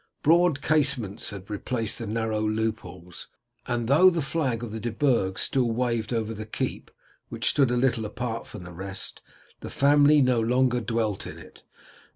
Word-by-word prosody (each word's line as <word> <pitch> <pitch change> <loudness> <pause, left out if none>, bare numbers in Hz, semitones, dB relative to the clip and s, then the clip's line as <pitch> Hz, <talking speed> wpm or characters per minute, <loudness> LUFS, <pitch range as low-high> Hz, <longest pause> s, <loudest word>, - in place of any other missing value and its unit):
Broad 165 -2 +3
casements 135 -10 +1
had 100 -1 -9
replaced 110 +1 -2
the 115 - -5
narrow 110 0 -1
loopholes, 110 -6 -4 0.4
and 120 -1 -1
though 155 +8 +6
the 170 -4 -1
flag 135 -5 -1
of 115 - -5
the 110 - -5
De 120 +2 -3
Burgs 115 -7 +1
still 125 -3 +1
waved 115 -1 -1
over 115 -2 -1
the 110 0 -7
keep, - - -4 0.4
which - - -2
stood 135 -4 +3
a 125 - 0
little 120 -3 +1
apart 115 +2 -4
from 105 - -9
the 90 0 -10
rest, 95 +2 -6 0.4
the - - -8
family 145 +1 +4
no 130 -3 +3
longer 125 +2 +2
dwelt 110 -2 -2
in - - -9
it. - - -15
115 Hz, 175 wpm, -26 LUFS, 110-135 Hz, 0.4 s, though